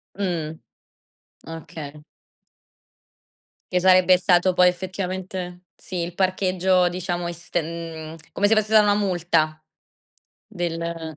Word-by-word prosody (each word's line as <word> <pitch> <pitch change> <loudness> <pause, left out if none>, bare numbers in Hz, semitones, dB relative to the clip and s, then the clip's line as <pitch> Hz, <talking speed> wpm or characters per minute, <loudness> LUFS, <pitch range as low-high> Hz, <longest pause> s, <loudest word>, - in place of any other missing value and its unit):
Mh, 170 -6 -2 0.9
okay. 155 -2 -9 1.7
Che 180 - +3
sarebbe 185 0 +6
stato 180 0 +3
poi 180 0 +5
effettivamente 185 0 -4
sì, 185 - -8
il 170 0 -3
parcheggio 185 -1 +2
diciamo 175 -1 -3
est 175 0 -3
mhmm, 165 -1 -7 0.2
come 205 - +2
se 225 - +5
fosse 215 -1 +1
stata 220 0 +6
una 205 0 +3
multa 170 -6 0 0.8
del 170 -4 -4
180 Hz, 110 wpm, -23 LUFS, 165-185 Hz, 1.7 s, sarebbe